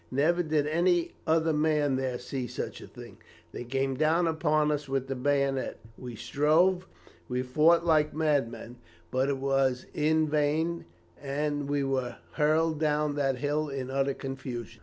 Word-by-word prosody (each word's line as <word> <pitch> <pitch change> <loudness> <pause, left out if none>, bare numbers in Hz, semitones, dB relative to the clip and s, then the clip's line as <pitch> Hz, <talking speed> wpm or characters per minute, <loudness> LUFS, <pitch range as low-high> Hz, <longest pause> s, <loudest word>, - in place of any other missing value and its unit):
Never 160 +6 +2
did 155 -3 0
any 170 +2 +1 0.2
other 160 0 +2
man 150 -2 +2
there 130 -1 -2
see 125 +1 -5
such - - -6
a - - -10
thing. - - -12 0.3
They - - -6
came 135 +2 -1
down 155 +5 +2
upon 155 -2 +1
us 145 -1 -3
with 135 -1 -1
the 135 - -3
bayonet. 140 0 0 0.2
We 125 -1 -8
strove, 165 - +2 0.4
we 125 0 -1
fought 155 +7 +3
like 155 -2 +3
madmen; 140 -6 -1 0.3
but 130 +2 +1
it 140 - 0
was 135 -1 +1
in 155 +1 +2
vain, 155 +3 0 0.4
and 145 0 -2
we 145 -1 +1
were 130 -3 -1 0.2
hurled 155 +1 +1
down 150 -1 +1
that 135 -2 +1
hill 150 +3 -1
in 135 -1 -4
utter 135 0 0
confusion. 120 -4 -6
145 Hz, 160 wpm, -28 LUFS, 135-155 Hz, 0.4 s, fought